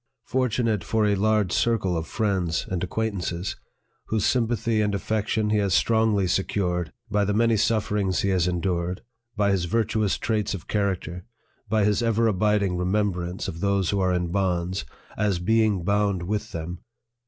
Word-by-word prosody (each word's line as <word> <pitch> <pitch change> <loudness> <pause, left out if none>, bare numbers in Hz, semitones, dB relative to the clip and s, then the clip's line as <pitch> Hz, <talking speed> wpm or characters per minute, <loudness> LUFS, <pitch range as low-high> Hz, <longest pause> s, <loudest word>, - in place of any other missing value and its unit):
fortu 125 -2 0
nate 105 -5 0
for 110 -1 +1
a 105 - +3
large 105 -1 +2
circle 105 -6 +1
of 80 -1 -3
friends 95 -6 -1
and 90 -2 -1
acquaintances, 95 -3 -2 0.5
whose 110 -2 0
sympathy 115 -2 +1
and 105 -1 0
affection 110 +1 -1
he 110 - +3
has 100 -4 +2
strongly 110 -3 +3
secured 90 -2 -1 0.2
by 105 0 +2
the 100 0 0
many 115 +1 +3
sufferings 105 -3 +1
he 100 - 0
has 90 -2 +2
endured, 90 0 -1 0.3
by 100 -1 +3
his 95 -3 +1
virtuous 110 +1 0
traits 105 -2 -1
of 90 - -9
character, 95 -4 -2 0.5
by 110 0 +2
his 105 +2 +2
ever 115 0 +2
abiding 105 -2 +2
remembrance 90 -1 -1
of 80 - -5
those 100 -1 +1
who 100 - 0
are 95 -1 +2
in 90 -1 -1
bonds 90 -1 -1 0.3
r - - +1
as 100 -4 +1
being 105 0 +2
bound 100 -1 +1
with 105 +3 -3
them 85 +2 -5
100 Hz, 165 wpm, -25 LUFS, 90-110 Hz, 0.5 s, a